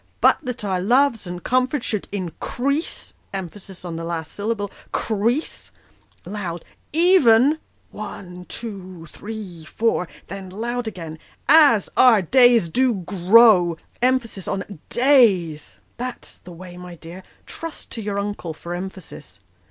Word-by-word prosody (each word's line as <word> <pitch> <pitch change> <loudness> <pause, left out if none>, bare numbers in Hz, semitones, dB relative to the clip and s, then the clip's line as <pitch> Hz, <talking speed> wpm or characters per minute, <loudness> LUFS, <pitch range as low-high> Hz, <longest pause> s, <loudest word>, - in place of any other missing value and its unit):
" - - -38
' - - -39
But - - +5
that 250 -6 -5
our 185 -2 0
loves 240 0 +2
and 175 0 -6
comforts 255 +1 +1
should 210 -3 -2
increase 245 - -3
' - - -39
emphasis 190 0 -8
on 170 -2 -5
the 165 - -5
last 165 -1 -4
syllable, 205 -1 -3
' - - -31
crease,' 230 +7 -1 0.6
loud 180 -4 -5 0.2
' - - -41 0.2
even,' 285 -4 +5 0.3
one, 180 -4 -8
two, 185 -7 -7
three, 205 -6 -8
four; 200 +2 0 0.2
then 190 0 -8
loud 235 +5 -3
again, 165 -6 -7 0.3
' - - -37 0.3
as 205 - -4
our 225 -6 +6
days 245 -1 +5
do 250 +6 +2
grow; 185 -1 +5
' - - -35
emphasis 240 -6 0
on 195 -2 -4
days. 205 - +3 0.2
That's 250 0 -7
the 180 - -13
way, 175 +1 -11
my 180 -1 -9
dear; 170 +3 -10 0.2
trust 330 -1 -8
to 225 - -5
your 205 -1 -3
uncle 200 -5 -4
for 170 +2 -7
emphasis. 180 - -8
200 Hz, 150 wpm, -22 LUFS, 180-235 Hz, 0.6 s, our